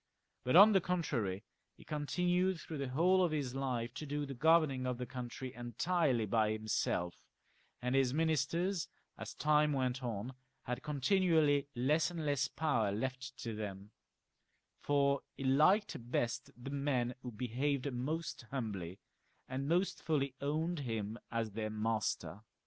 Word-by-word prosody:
But, 125 Hz, +4 st, +1 dB
on 205 Hz, +4 st, +10 dB
the 195 Hz, -, +5 dB
contrary, 120 Hz, -, -1 dB, 0.3 s
he -, -, -14 dB
continued 180 Hz, +4 st, 0 dB
through 155 Hz, -1 st, -6 dB
the 140 Hz, -, -2 dB
whole 180 Hz, +7 st, +4 dB
of 175 Hz, -, +2 dB
his 140 Hz, -5 st, -2 dB
life 125 Hz, -3 st, -2 dB
to 155 Hz, -, -6 dB
do 145 Hz, +1 st, -2 dB
the 140 Hz, -, -6 dB
governing 150 Hz, -2 st, +3 dB
of 125 Hz, -1 st, -1 dB
the 125 Hz, -, -4 dB
country 125 Hz, 0 st, -6 dB
entirely 120 Hz, -, 0 dB
by 110 Hz, +1 st, +2 dB
himself, 110 Hz, -5 st, -1 dB, 0.7 s
and 125 Hz, +1 st, 0 dB
his 135 Hz, -2 st, +3 dB
ministers, 165 Hz, +4 st, +1 dB, 0.3 s
as -, -, -7 dB
time 150 Hz, 0 st, +3 dB
went 130 Hz, -1 st, 0 dB
on, 120 Hz, 0 st, -4 dB, 0.3 s
had 125 Hz, +1 st, -3 dB
continually 150 Hz, -1 st, +2 dB
less 150 Hz, +7 st, +2 dB
and 165 Hz, -3 st, -5 dB
less 140 Hz, -2 st, +1 dB
power 130 Hz, -10 st, 0 dB
left 130 Hz, +4 st, -4 dB
to 115 Hz, -, -3 dB
them, 100 Hz, -1 st, -6 dB, 0.9 s
for 140 Hz, -1 st, +2 dB, 0.2 s
he -, -, -5 dB
liked' 145 Hz, -, +3 dB
best 120 Hz, -1 st, -1 dB
the 125 Hz, +3 st, -7 dB
men 135 Hz, -4 st, 0 dB
who 125 Hz, -, -6 dB
behaved 130 Hz, +4 st, -1 dB
most 150 Hz, +2 st, -3 dB
humbly, 100 Hz, -9 st, -4 dB, 0.5 s
and 135 Hz, +2 st, -3 dB
most 180 Hz, +3 st, +1 dB
fully 140 Hz, -4 st, 0 dB
owned 155 Hz, +4 st, -1 dB
him 115 Hz, -4 st, -3 dB
as 115 Hz, -2 st, -1 dB
their 110 Hz, +1 st, -3 dB
master. 110 Hz, -2 st, -2 dB
135 Hz, 150 wpm, -35 LUFS, 120-155 Hz, 0.9 s, on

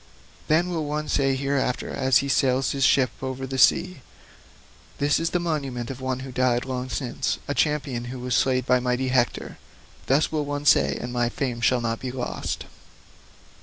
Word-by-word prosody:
Then 165 Hz, +4 st, +3 dB
will 165 Hz, -3 st, -2 dB
one 150 Hz, +1 st, -3 dB
say 135 Hz, -1 st, +1 dB
hereafter 135 Hz, -2 st, -1 dB
as 130 Hz, -2 st, +3 dB
he -, -, -3 dB
sails 135 Hz, -1 st, +2 dB
his 135 Hz, -1 st, -1 dB
ship 130 Hz, 0 st, +4 dB
over 130 Hz, 0 st, -4 dB
the 130 Hz, 0 st, -4 dB
sea, 180 Hz, +1 st, +3 dB, 1.0 s
'This 145 Hz, +1 st, +2 dB
is 165 Hz, 0 st, 0 dB
the 175 Hz, -, 0 dB
monument 140 Hz, -8 st, -3 dB
of 130 Hz, 0 st, -8 dB
one 130 Hz, 0 st, -2 dB
who 135 Hz, 0 st, -7 dB
died 125 Hz, 0 st, +1 dB
long 130 Hz, -1 st, -4 dB
since 125 Hz, +1 st, -2 dB
a 145 Hz, -, -1 dB
champion 140 Hz, -6 st, 0 dB
who 125 Hz, +2 st, -6 dB
was 125 Hz, 0 st, -3 dB
slain 130 Hz, -1 st, +2 dB
by 125 Hz, 0 st, +2 dB
mighty 125 Hz, +1 st, -1 dB
Hector.' 125 Hz, -2 st, 0 dB, 0.5 s
Thus 140 Hz, +4 st, +2 dB
will 155 Hz, -2 st, 0 dB
one 145 Hz, 0 st, -4 dB
say, -, -, +4 dB
and 120 Hz, 0 st, -5 dB
my 120 Hz, -1 st, +1 dB
fame 120 Hz, -2 st, -3 dB
shall 125 Hz, +1 st, +3 dB
not 115 Hz, -1 st, -2 dB
be 130 Hz, -, -4 dB
lost." 125 Hz, -1 st, -4 dB
130 Hz, 185 wpm, -24 LUFS, 125-140 Hz, 1.0 s, ship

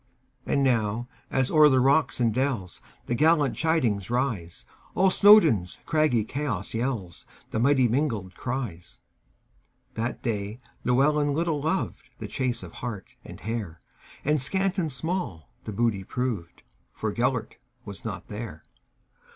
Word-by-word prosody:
And 140 Hz, -, +2 dB
now, 115 Hz, -2 st, +1 dB, 0.2 s
as 130 Hz, -1 st, +1 dB
o'er 155 Hz, -1 st, +7 dB
the 130 Hz, -2 st, +4 dB
rocks 135 Hz, 0 st, +3 dB
and 115 Hz, -3 st, +2 dB
dellsThe 120 Hz, -3 st, -3 dB
gallant 155 Hz, +1 st, +3 dB
chidings 125 Hz, -, +1 dB
rise, 115 Hz, -9 st, -2 dB, 0.3 s
All 190 Hz, 0 st, +4 dB
Snowdon's 165 Hz, -, +6 dB
craggy 155 Hz, -8 st, +2 dB
chaos 115 Hz, -6 st, -3 dB
yellsThe 110 Hz, -3 st, -4 dB
many 130 Hz, -1 st, +4 dB
mingled 115 Hz, -7 st, -1 dB
cries! 120 Hz, -8 st, -5 dB, 0.9 s
That 115 Hz, +2 st, -3 dB
day 105 Hz, -1 st, -3 dB, 0.2 s
Llewelyn 145 Hz, +3 st, +2 dB
little 160 Hz, -2 st, 0 dB
lovedThe 160 Hz, +5 st, -3 dB
chase 130 Hz, -6 st, -2 dB
of 85 Hz, -, -9 dB
hart 115 Hz, -6 st, -6 dB
and -, -, -11 dB
hare; 105 Hz, -7 st, -4 dB, 0.5 s
And 150 Hz, 0 st, +2 dB
scant 190 Hz, +6 st, 0 dB
and 160 Hz, -4 st, -1 dB
small 135 Hz, -, -3 dB
the -, -, -4 dB
booty 105 Hz, -2 st, 0 dB
proved, 110 Hz, -7 st, -4 dB, 0.3 s
For 110 Hz, -1 st, -2 dB
Gêlert 125 Hz, -1 st, -1 dB, 0.3 s
was 100 Hz, -3 st, -8 dB
not 105 Hz, -4 st, -6 dB
there. 105 Hz, -7 st, -7 dB
125 Hz, 125 wpm, -26 LUFS, 105-145 Hz, 0.9 s, o'er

